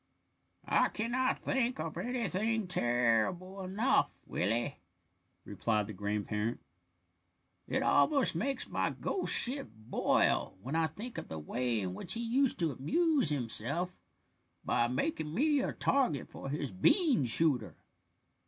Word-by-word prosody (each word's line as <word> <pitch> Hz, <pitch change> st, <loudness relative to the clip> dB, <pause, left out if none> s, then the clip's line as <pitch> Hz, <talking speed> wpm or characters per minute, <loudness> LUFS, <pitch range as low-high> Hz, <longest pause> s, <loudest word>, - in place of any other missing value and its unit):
"I -, -, +3 dB
cannot 245 Hz, +4 st, -1 dB
think 250 Hz, -, 0 dB
of 155 Hz, 0 st, -4 dB
anything 220 Hz, 0 st, -1 dB
terrible 125 Hz, -, 0 dB
enough, 200 Hz, +7 st, 0 dB
Willie," 115 Hz, +8 st, -1 dB, 0.7 s
replied 105 Hz, +1 st, -1 dB
the 110 Hz, -, -7 dB
grandparent. 105 Hz, +3 st, -2 dB, 1.1 s
"It -, -, 0 dB
almost 280 Hz, -5 st, +3 dB
makes 275 Hz, -1 st, -1 dB
my -, -, 0 dB
ghost 380 Hz, -, -1 dB
ship 255 Hz, -, +4 dB
boil 110 Hz, -3 st, 0 dB
when 135 Hz, +10 st, -5 dB
I 165 Hz, -1 st, +2 dB
think 220 Hz, +10 st, -7 dB
of -, -, -9 dB
the 80 Hz, -, -6 dB
way 120 Hz, +9 st, -1 dB
in 90 Hz, -2 st, -3 dB
which 135 Hz, -, -1 dB
he 230 Hz, -, -2 dB
used 260 Hz, +3 st, +1 dB
to 165 Hz, -3 st, 0 dB
amuse 285 Hz, -, +2 dB
himself 145 Hz, +6 st, -2 dB, 0.7 s
by 120 Hz, -, +2 dB
making 155 Hz, -, -2 dB
me 295 Hz, +3 st, +3 dB
a -, -, -1 dB
target 250 Hz, -, 0 dB
for 135 Hz, -, -7 dB
his 145 Hz, -2 st, -3 dB
bean 250 Hz, -, +3 dB
shooter. 125 Hz, -, +2 dB
160 Hz, 130 wpm, -32 LUFS, -, 1.1 s, ship